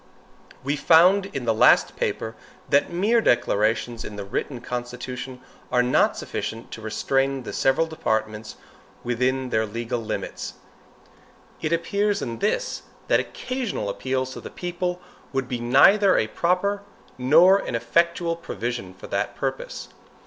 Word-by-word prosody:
We 140 +2 0
found 180 +6 +5
in 135 -9 -5
the 115 - +2
last 110 - +5
paper, 110 - -2 0.4
that 140 - +3
mere 210 +7 +2
declarations 115 - +1
in 105 - -7
the 100 - -5
written 120 +6 -3
constitution 125 +1 -6 0.3
are 125 0 +3
not 125 - +2
sufficient 115 +1 -5
to 110 - -7
restrain 135 +4 0
the - - -7
several 135 +5 +2
departments 110 -8 -2 0.5
within 130 +2 0
their 110 0 +1
legal 115 +2 -3
rights. 110 -1 -5 1.1
It 155 - -1
appears 200 +4 +1
in 115 -1 -5
this, - - -1 0.3
that - - +5
occasional 250 - -3
appeals 130 +4 -2
to - - -8
the - - -8
people 180 0 -3 0.3
would 135 -1 -1
be 125 -1 -3
neither 185 - +5
a - - +2
proper 185 - 0 0.4
nor 165 +10 +6
an - - -4
effectual 170 +8 +1
provision 120 - -5
for - - -11
that - - -2
purpose. - - -4
130 Hz, 140 wpm, -24 LUFS, 115-175 Hz, 1.1 s, nor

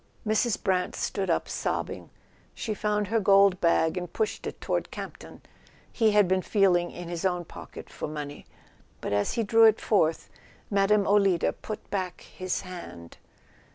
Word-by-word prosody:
Mrs. 220 +1 +1
Brant 185 -3 0
stood 190 -2 -2
up 165 - +1
sobbing. - - -3 0.5
She 220 - -3
found 210 -1 -1
her 225 +1 +2
gold 195 -2 +5
bag 165 0 +2
and 180 -1 -4
pushed 220 +2 -2
it - - -7
toward - - -2
Campton. - - -9 0.5
He 225 -2 +3
had 210 -2 +4
been 185 +1 +2
feel¬ 195 -2 +3
ing 175 0 -4
in 175 -1 -8
his 170 0 -5
own 180 -2 0
pocket - - -10
for - - -6
money; 145 -1 -7 0.5
but - - -3
as 100 0 +1
he 230 - 0
drew 225 +2 +5
it 220 0 +5
forth 165 -7 +1 0.4
Mme. 200 +1 +3
Olida 195 -4 +3
put 215 - -8
back 185 -3 -3
his 185 0 -4
hand. 90 - -10
190 Hz, 165 wpm, -27 LUFS, 175-210 Hz, 0.5 s, gold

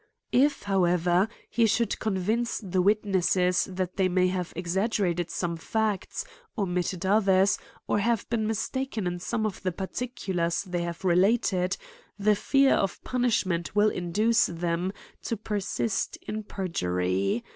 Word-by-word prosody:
If, 280 0 +3
however, 180 -1 +2 0.2
he 230 -1 +2
should 225 0 +1
convince 220 +3 0
the 185 -3 -1
witnesses, 185 -2 +2
that 185 -1 -4
they 190 -2 +3
may 185 0 +3
have 180 -2 -3
exaggerated 180 -1 0
some 170 -1 -2
facts, 215 +3 -2 0.3
omitted 180 -2 -1
others, 195 -1 +4 0.3
or - - +2
have 230 +1 0
been 220 -2 0
mistaken 225 0 -2
in 175 0 -2
some 220 +4 -2
of 205 -3 -3
the 185 - -1
particulars 190 -3 -2
they 180 -3 -3
have 170 +1 -5
related, 185 0 +2 0.4
the 210 +1 +3
fear 275 +6 +3
of 195 - -1
punishment 210 -9 0
will 210 +1 +5
induce 210 +7 +2
them 170 +2 -2 0.3
to 230 - -3
persist 205 0 -2
in 215 0 -5
perjury. 95 - -1
190 Hz, 135 wpm, -27 LUFS, 175-215 Hz, 0.4 s, will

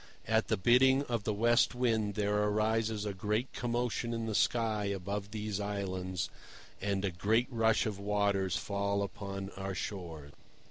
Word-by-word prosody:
At - - +2
the - - +1
bidding 130 +6 +5
of 120 -6 -3
the 105 - +1
West 120 +4 +3
Wind 110 -4 +1
there 105 -1 +1
arises 110 +1 +1
a 105 - -2
great 105 +6 -1
commotion 120 -1 -1
in 115 0 -2
the 110 - -2
sky 110 -1 +1
above 100 +1 -3
these 105 -1 -3
Islands, 95 -3 -3 0.5
and 100 0 0
a 95 - 0
great 110 +7 +2
rush 110 -3 +3
of 105 -3 -3
waters 100 -2 +1
falls 100 0 -1
upon 100 0 -6
our 95 0 -5
shores. 85 -7 -5
105 Hz, 155 wpm, -32 LUFS, 100-115 Hz, 0.5 s, bidding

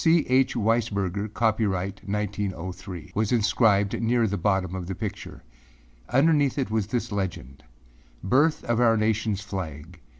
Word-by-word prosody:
âC. 165 -1 +4
H. 130 0 +3
Weisberger, 105 -3 0
Copyright 100 -4 0
1903,â 95 -3 -4
was 110 0 0
inscribed 105 -3 +2
near 115 0 +2
the 100 -2 -1
bottom 95 -3 0
of 90 -2 -5
the 95 - -4
picture. - - -6 0.7
Underneath 145 +1 +3
it 130 -6 -1
was 110 -3 0
this 120 +1 -2
legend; 90 -10 -4 0.6
âBirth 145 +9 +3
of 120 0 0
our 115 -2 +4
nationâs 110 -1 0
flag. 90 -4 -7
105 Hz, 135 wpm, -25 LUFS, 95-115 Hz, 0.7 s, âC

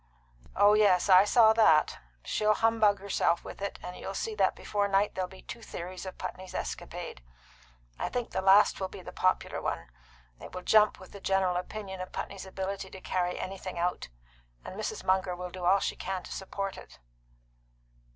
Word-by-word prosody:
"Oh 205 +1 +6
yes, 205 -3 +4
I 185 +1 +8
saw 220 0 +6
that. 165 -9 +4 0.2
She'll 215 0 +1
humbug 220 -2 +3
herself 195 -3 0
with - - -9
it, 200 - -3
and 180 - -6
you'll 195 - -6
see 220 - -2
that 195 -3 +2
before 205 -1 -1
night 200 +1 +2
there'll 185 -1 -2
be 190 - -14
two 235 - -8
theories 185 -2 -7
of 185 - -8
Putney's 185 0 -7
escapade. - - -5 0.8
I - - -1
think 245 -2 -3
the 190 - -1
last 195 +2 +5
will 190 - -1
be 185 0 -11
the - - -8
popular 185 0 0
one. - - -4 0.5
It - - -11
will 180 - -6
jump 215 +1 +4
with 185 - -13
the 200 - -11
general 190 -2 +1
opinion 190 +1 -5
of 185 - -7
Putney's 195 -1 -6
ability 190 0 -4
to 190 - -10
carry 180 -1 -1
anything 185 -1 -6
out. 175 - -1 0.6
And - - -7
Mrs. - - -4
Munger 185 -1 +1
will 180 0 -6
do 180 -1 -6
all 190 +3 +5
she - - -2
can 190 -1 -4
to - - -11
support 195 0 -4
it." - - -15
190 Hz, 190 wpm, -29 LUFS, 185-205 Hz, 0.8 s, I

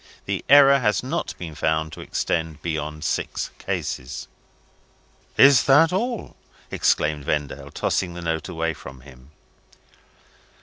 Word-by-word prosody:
The - - -3
error 140 0 +8
has 105 -5 +1
not 155 +7 -3
been 85 -3 -7
found 80 +1 -1
to - - -8
extend 80 -2 -2
beyond 75 -2 -4
six 70 - -2
cases." 65 -1 -4 1.1
"Is 140 -3 +7
that 160 +5 +5
all!" 235 +4 -2 0.4
exclaimed 75 -1 +1
Vendale, 70 -1 -3
tossing 90 +4 -2
the 85 - -6
note 80 +1 -2
away 80 -2 -2
from 65 -3 -12
him. 65 -1 -16
80 Hz, 125 wpm, -23 LUFS, -, 1.1 s, error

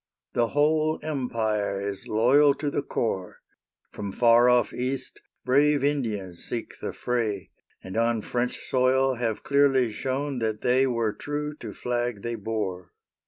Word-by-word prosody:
The 120 -1 +2
whole 155 +1 +3
Empire 110 -9 -1
is 100 -1 -3
loyal 135 +6 +4
to 145 -1 -3
the - - 0
core. 95 -9 -3 0.5
From 100 -1 -5
far 120 +2 +5
off 125 0 +3
East, 130 +1 -4 0.2
brave 140 +2 +3
Indians 110 -11 -1
seek 115 - -5
the - - -4
fray, 110 -6 -2 0.3
And 95 - -8
on 115 -1 +1
French 125 0 -2
soil 130 +1 +3
have 115 -3 -2
clearly 135 -4 +3
shown 135 +4 -2
that 110 -2 -2
they 130 +2 +3
Were 115 -4 0
true 150 +3 -4
to 110 -7 -7
flag 120 -1 -3
they 120 - -2
bore. 100 -5 -4
120 Hz, 145 wpm, -26 LUFS, 110-135 Hz, 0.5 s, far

